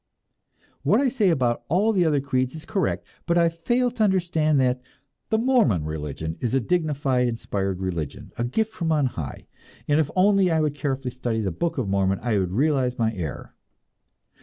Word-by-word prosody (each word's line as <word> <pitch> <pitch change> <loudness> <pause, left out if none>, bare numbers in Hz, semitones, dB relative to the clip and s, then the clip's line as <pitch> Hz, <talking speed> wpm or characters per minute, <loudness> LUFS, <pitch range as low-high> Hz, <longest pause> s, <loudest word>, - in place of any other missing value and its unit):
What - - +3
I 275 -1 +3
say 220 -6 +2
about 125 -7 +1
all 205 +6 +2
the 180 -4 +3
other 150 -3 +2
creeds 130 -1 -1
is 160 - -9
correct 195 - -1 0.2
but 170 0 +2
I 170 -1 +4
fail 240 +10 0
to 230 -2 0
understand 170 -7 +2
that 125 -1 +1 0.5
the 220 - +2
Mormon 225 - +3
religion 80 +1 -4
is 120 +1 -1
a - - +4
dignified 140 -5 +1
and - - +1
inspired 100 -5 -3
religion, 85 -6 -4
a 120 - -2
gift 220 - -1
from 170 -6 -2
on 150 -3 +3
high, 80 - -5 0.4
and 145 +1 +3
if 155 -2 +1
only 195 0 +4
I 160 -1 +2
would 150 -2 +1
carefully 135 -3 -3
study 120 -2 -2
the 95 -3 -1
"Book 165 - -2
of 125 -6 -1
Mormon," 95 0 +1
I 115 -4 +1
would 90 -2 -1
realize 130 0 +1
my 115 -1 +1
error! 80 - -6
140 Hz, 190 wpm, -24 LUFS, 115-175 Hz, 0.5 s, I